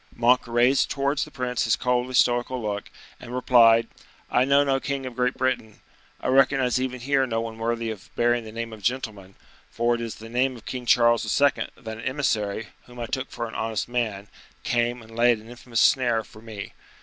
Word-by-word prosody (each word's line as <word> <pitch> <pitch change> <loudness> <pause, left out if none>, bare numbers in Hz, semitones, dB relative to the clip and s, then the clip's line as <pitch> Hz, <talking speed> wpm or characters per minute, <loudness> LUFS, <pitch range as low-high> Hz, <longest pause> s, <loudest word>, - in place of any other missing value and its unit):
Monk 120 +1 +3
raised 120 +3 +3
towards 140 +1 0
the - - -13
prince 125 -4 -2
his 110 0 +3
coldly 125 +1 0
stoical 120 +1 +2
look, 105 -3 -4 0.3
and 120 - -8
replied: 115 -2 +5 0.4
"I 125 +1 +3
know 140 +1 +4
no 135 -1 +1
king 140 -1 -3
of 125 -2 -7
Great 125 0 0
Britain; 125 -5 -2 0.4
I - - -3
recognize 130 -1 +3
even 125 -1 -3
here 135 +1 +1
no 115 -2 -1
one 115 0 -5
worthy 115 0 -1
of 105 -4 -10
bearing 120 0 +2
the 110 - -9
name 115 0 -5
of 110 - -11
gentleman: 105 -5 -3 0.3
for 120 +4 +1
it 120 - -2
is 115 -1 -6
in 115 +1 -11
the 125 - 0
name 130 -1 +1
of 115 - -16
King 125 -2 -6
Charles 120 -1 +4 0.2
II. 140 -1 +2
that 110 -2 -7
an - - -7
emissary, 110 -6 -1 0.2
whom 125 0 -12
I 120 - -2
took 130 +2 -3
for 120 -1 -4
an 115 - -10
honest 110 -2 -2
man, 110 -5 -2 0.4
came 120 0 0
and 115 0 -14
laid 120 0 +4
an 110 +2 -13
infamous 120 -1 -2
snare 120 -4 +3
for 110 - -16
me. 110 -3 -8
120 Hz, 210 wpm, -25 LUFS, 115-130 Hz, 0.4 s, replied